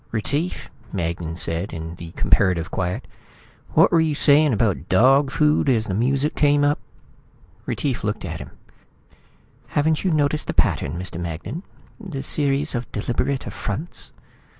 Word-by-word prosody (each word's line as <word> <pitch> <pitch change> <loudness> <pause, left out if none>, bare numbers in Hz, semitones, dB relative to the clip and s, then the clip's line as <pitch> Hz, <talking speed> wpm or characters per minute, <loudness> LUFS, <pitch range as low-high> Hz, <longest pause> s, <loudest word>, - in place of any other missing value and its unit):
"Retief," 145 - -2 0.2
Magnan 85 -2 -3
said 85 +3 -1
in 80 0 -6
the 85 -1 -9
comparative 90 -4 +2
quiet, 90 -1 -2 0.7
"what - - +6
were 165 - +5
you 155 -2 +1
saying 145 +1 +5
about 100 - 0
dog 135 +8 +5
food 150 0 +2
as 115 -4 +2
the 95 - -3
music 135 +7 +1
came 145 -1 +3
up?" 145 +1 +2 0.9
Retief 135 -4 -2
looked 105 0 -2
at - - -5
him. - - -8 1.3
"Haven't 155 +1 +2
you 190 - +2
noticed 150 -1 +1
the - - -3
pattern, 70 - +1
Mr. 90 -2 -6
Magnan? 85 - -5 0.4
The 175 -11 -6
series 145 0 +1
of 120 -1 -4
deliberate 125 +5 -1
affronts?" 145 - -5
130 Hz, 145 wpm, -22 LUFS, 95-145 Hz, 1.3 s, what